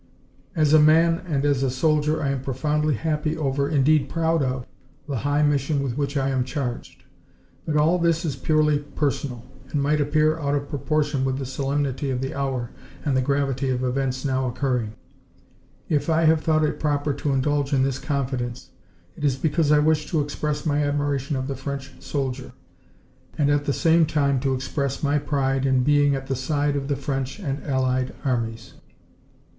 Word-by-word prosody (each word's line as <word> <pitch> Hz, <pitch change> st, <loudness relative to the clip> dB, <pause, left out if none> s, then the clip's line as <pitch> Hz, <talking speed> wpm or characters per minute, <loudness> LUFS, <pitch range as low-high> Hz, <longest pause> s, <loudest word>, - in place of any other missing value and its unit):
"As 155 Hz, -2 st, +3 dB
a 155 Hz, -, +8 dB
man 165 Hz, +3 st, +5 dB
and 145 Hz, -4 st, 0 dB
as 140 Hz, -2 st, +2 dB
a 135 Hz, -, +1 dB
soldier 150 Hz, +3 st, +1 dB
I 140 Hz, -, +1 dB
am 135 Hz, -2 st, -1 dB
profoundly 150 Hz, +3 st, 0 dB
happy 155 Hz, +3 st, -1 dB
over, 140 Hz, -1 st, 0 dB
indeed 145 Hz, -1 st, +3 dB
proud 165 Hz, -1 st, +1 dB
of, 130 Hz, -2 st, -2 dB, 0.4 s
the 140 Hz, -3 st, -2 dB
high 145 Hz, +4 st, +1 dB
mission 145 Hz, 0 st, +1 dB
with 125 Hz, -4 st, -2 dB
which 140 Hz, 0 st, -2 dB
I 135 Hz, 0 st, +1 dB
am 130 Hz, -2 st, +1 dB
charged. 125 Hz, -2 st, -5 dB, 0.6 s
But 150 Hz, -1 st, +1 dB
all 160 Hz, +4 st, +3 dB
this 170 Hz, 0 st, +1 dB
is 145 Hz, -, -2 dB
purely 150 Hz, -1 st, +2 dB
personal, 140 Hz, -4 st, -3 dB, 0.2 s
and 145 Hz, -, -1 dB
might 150 Hz, +2 st, +2 dB
appear 155 Hz, +2 st, +2 dB
out 145 Hz, -2 st, 0 dB
of 140 Hz, 0 st, -3 dB
proportion 145 Hz, 0 st, 0 dB
with 130 Hz, 0 st, 0 dB
the 135 Hz, -, -4 dB
solemnity 135 Hz, +1 st, -2 dB
of 130 Hz, -1 st, -1 dB
the 135 Hz, +1 st, -3 dB
hour 135 Hz, -4 st, -2 dB, 0.3 s
and 140 Hz, -3 st, +1 dB
the 130 Hz, -, +3 dB
gravity 135 Hz, 0 st, 0 dB
of 130 Hz, 0 st, -1 dB
events 130 Hz, +1 st, -1 dB
now 130 Hz, -1 st, 0 dB
occurring. 125 Hz, -3 st, -1 dB, 0.9 s
If 145 Hz, 0 st, 0 dB
I 165 Hz, +1 st, +3 dB
have 160 Hz, 0 st, +4 dB
thought 155 Hz, -1 st, +2 dB
it 150 Hz, -, -1 dB
proper 145 Hz, -1 st, 0 dB
to 145 Hz, +1 st, -2 dB
indulge 140 Hz, +1 st, 0 dB
in 135 Hz, -2 st, +3 dB
this 135 Hz, -1 st, -1 dB
confidence, 130 Hz, -4 st, -3 dB, 0.4 s
it -, -, -9 dB
is 140 Hz, -3 st, +2 dB
because 150 Hz, +2 st, +1 dB
I 150 Hz, -, +6 dB
wish 150 Hz, 0 st, +2 dB
to 165 Hz, -, +1 dB
express 150 Hz, +1 st, -3 dB
my 150 Hz, -1 st, +1 dB
admiration 145 Hz, -1 st, -1 dB
of 130 Hz, 0 st, -2 dB
the 140 Hz, -, -2 dB
French 140 Hz, 0 st, -6 dB
soldier, 135 Hz, -2 st, -4 dB, 0.8 s
and 145 Hz, -1 st, +2 dB
at 145 Hz, 0 st, +1 dB
the 145 Hz, -, +1 dB
same 165 Hz, +1 st, +3 dB
time 140 Hz, -3 st, +1 dB
to 135 Hz, 0 st, 0 dB
express 140 Hz, +1 st, -3 dB
my 145 Hz, +1 st, +2 dB
pride 135 Hz, -2 st, 0 dB
in 130 Hz, -2 st, +2 dB
being 145 Hz, 0 st, +3 dB
at 135 Hz, 0 st, -5 dB
the 135 Hz, -, -2 dB
side 145 Hz, +3 st, 0 dB
of 140 Hz, -1 st, -2 dB
the 140 Hz, -, 0 dB
French 135 Hz, 0 st, -3 dB
and 145 Hz, -8 st, -4 dB
allied 130 Hz, -2 st, 0 dB
armies. 115 Hz, -4 st, -2 dB
140 Hz, 185 wpm, -24 LUFS, 135-150 Hz, 0.9 s, a